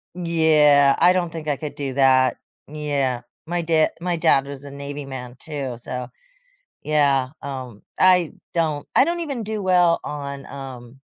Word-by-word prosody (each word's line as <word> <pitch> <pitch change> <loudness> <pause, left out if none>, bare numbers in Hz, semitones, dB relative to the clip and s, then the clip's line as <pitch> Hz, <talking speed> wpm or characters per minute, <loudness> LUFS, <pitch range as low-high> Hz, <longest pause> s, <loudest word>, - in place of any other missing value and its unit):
Yeah, 155 -5 +4
I 175 +2 +6
don't 180 -2 0
think 160 -2 -7
I 145 - 0
could 150 -2 -6
do 140 -2 -4
that. 130 -1 +4 0.3
Yeah, 140 -5 -2 0.2
my 175 +2 -2
da 160 -1 +3
my 175 0 -1
dad 160 -5 +3
was 140 -1 -8
a 140 - -9
Navy 140 0 -7
man, 125 -2 -8
too, 140 -6 -5
so 125 +1 -6 0.8
Yeah, 140 -4 +2
um, 130 -6 -7 0.2
I 180 -3 +5 0.2
don't 155 -4 -1
I - - +7
don't 345 +1 -1
even 280 -8 -4
do 215 0 -4
well 180 -3 +3
on, 140 -1 -6
um 130 -2 -10
145 Hz, 160 wpm, -22 LUFS, 135-170 Hz, 0.8 s, I